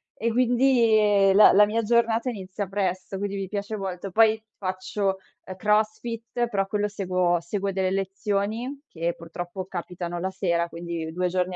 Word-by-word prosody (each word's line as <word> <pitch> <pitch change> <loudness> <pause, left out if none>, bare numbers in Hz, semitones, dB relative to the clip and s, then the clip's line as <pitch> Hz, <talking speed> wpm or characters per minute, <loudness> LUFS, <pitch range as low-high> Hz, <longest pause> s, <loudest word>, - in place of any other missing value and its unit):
e 230 +1 -1
quindi, 245 -1 +4
ehm, 200 -2 +4
la 210 - +8
la 210 +2 +7
mia 225 +2 0
giornata 230 +1 +2
inizia 195 -3 -5
presto, 190 -1 -2
quindi 200 0 -3
mi 195 -1 -3
piace 205 +2 -4
molto. 190 -1 -5
Poi 220 +2 +4 0.2
faccio, 190 +1 -2 0.3
ehm, 185 - -8
crossfit, 220 +3 0
però 195 -2 0
quello 210 0 0
seguo 185 -3 0
seguo 195 +3 -2
delle 190 -1 0
lezioni 200 +6 -2
che 170 - -2
purtroppo 175 +2 -7
capitano 175 -1 -5
la 190 +2 -2
sera, 170 -3 0
quindi 170 -1 -5
2 180 +2 -1
giorni 180 0 -1
195 Hz, 160 wpm, -25 LUFS, 185-215 Hz, 0.3 s, la